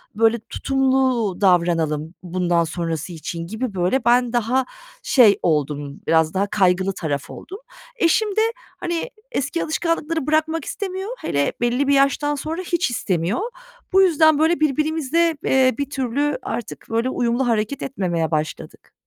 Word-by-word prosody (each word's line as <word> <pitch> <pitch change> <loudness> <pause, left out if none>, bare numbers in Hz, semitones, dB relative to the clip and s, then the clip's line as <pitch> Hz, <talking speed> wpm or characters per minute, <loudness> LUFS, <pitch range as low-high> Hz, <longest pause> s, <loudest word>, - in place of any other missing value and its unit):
böyle 225 +1 +3
tutumlu 260 -6 +1
davranalım, 165 -4 +2
bundan 175 -1 +1
sonrası 165 0 -4
için.“ 165 +1 -6
gibi, 220 +3 -4
böyle, 190 +8 0
ben 245 0 +3
daha 245 +3 +1 0.4
şey 235 - +5
oldum, 145 -2 -1
biraz 160 0 +3
daha 195 +2 0
kaygılı 190 -2 +2
taraf 145 -6 -3
oldum. 390 +4 -9 0.4
Eşim 425 +1 +2
de, 440 - +3 0.4
hani, 345 +7 -3 0.2
eski 295 - -1
alışkanlıkları 325 -2 -1
bırakmak 315 0 +1
istemiyor, 385 +1 -4
hele 140 - 0
belli 245 +4 +1
bir 280 - +4
yaştan 275 +2 +2
sonra 315 +5 -4
hiç 345 -5 0
istemiyor. 190 - -1 0.5
Bu 385 - +6
yüzden, 315 -4 +4
böyle, 320 +2 +3
birbirimize, 310 +2 +1
eee, 260 -2 +3
bir 280 -1 -3
türlü 280 +2 -1
artık, 235 - -5
böyle, 230 +3 0
uyumlu 245 +1 0
hareket 225 +3 -1
etmemeye 175 -10 -2
başladık. 155 0 -4
245 Hz, 140 wpm, -21 LUFS, -, 0.5 s, Bu